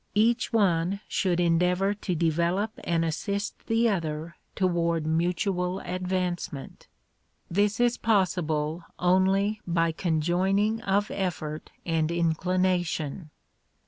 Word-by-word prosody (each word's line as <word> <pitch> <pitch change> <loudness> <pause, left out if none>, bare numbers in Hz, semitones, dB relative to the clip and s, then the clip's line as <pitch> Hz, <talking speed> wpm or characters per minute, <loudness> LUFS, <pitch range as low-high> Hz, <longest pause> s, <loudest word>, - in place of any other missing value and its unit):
Each 230 +3 +2
one 190 -3 +2
should 180 -2 0
endeavor 180 +3 +2
to 200 -3 -3
develop 170 +6 +1
and 165 -1 +1
assist 200 +5 -3
the 225 +1 +3
other 165 -5 -2 0.2
toward 170 -3 +1
mutual 180 +3 0
advancement. 180 -5 -3 0.6
This 205 +4 +1
is 240 0 +2
possible 170 -6 +1
only 190 +4 +2
by 165 -1 +2
conjoining 185 +7 +1
of 205 -1 0
effort 155 -5 -3 0.2
and 160 -1 0
inclination. 170 -2 0
180 Hz, 100 wpm, -27 LUFS, 165-195 Hz, 0.6 s, the